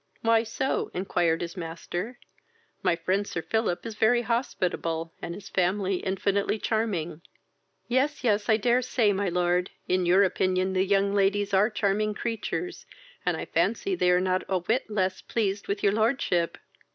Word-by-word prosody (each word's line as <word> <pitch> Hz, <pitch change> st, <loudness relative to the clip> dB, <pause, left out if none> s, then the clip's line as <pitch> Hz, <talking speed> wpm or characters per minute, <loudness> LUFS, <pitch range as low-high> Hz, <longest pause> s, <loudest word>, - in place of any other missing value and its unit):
"Why 225 Hz, 0 st, +4 dB
so? 230 Hz, +4 st, -2 dB
(inquired 175 Hz, -3 st, +1 dB
his 170 Hz, +1 st, -5 dB
master:) 175 Hz, +6 st, -5 dB, 0.6 s
my 170 Hz, -, +2 dB
friend, 190 Hz, +4 st, -1 dB
Sir 165 Hz, -, -4 dB
Philip, 220 Hz, -5 st, -1 dB
is 225 Hz, -, -4 dB
very 240 Hz, +3 st, +3 dB
hospitable, 175 Hz, -, -1 dB
and 170 Hz, -, -5 dB
his 205 Hz, -, -10 dB
family 185 Hz, +1 st, +1 dB
infinitely 200 Hz, +3 st, 0 dB
charming." 200 Hz, -8 st, -2 dB, 0.7 s
"Yes, 260 Hz, +3 st, +1 dB
yes, 210 Hz, -2 st, +1 dB
I 220 Hz, -, +5 dB
dare 240 Hz, +3 st, +2 dB
say, 230 Hz, -4 st, +2 dB
my 195 Hz, 0 st, 0 dB
lord, 180 Hz, +1 st, +1 dB, 0.2 s
in 185 Hz, -1 st, +1 dB
your 185 Hz, +3 st, +6 dB
opinion 185 Hz, 0 st, +1 dB
the 185 Hz, 0 st, +2 dB
young 200 Hz, 0 st, +2 dB
ladies 200 Hz, 0 st, +1 dB
are 200 Hz, +3 st, +4 dB
charming 210 Hz, 0 st, 0 dB
creatures, 240 Hz, -, -4 dB, 0.4 s
and -, -, +2 dB
I -, -, -4 dB
fancy 395 Hz, -, 0 dB
they 180 Hz, -, +2 dB
are 180 Hz, 0 st, +5 dB
not 185 Hz, 0 st, +1 dB
a 190 Hz, -, +2 dB
whit 220 Hz, +9 st, -1 dB
less 190 Hz, -3 st, -1 dB
pleased 205 Hz, -3 st, -2 dB
with 200 Hz, 0 st, -2 dB
your 200 Hz, -, +4 dB
lordship." 215 Hz, -6 st, +1 dB
200 Hz, 165 wpm, -27 LUFS, 180-220 Hz, 0.7 s, your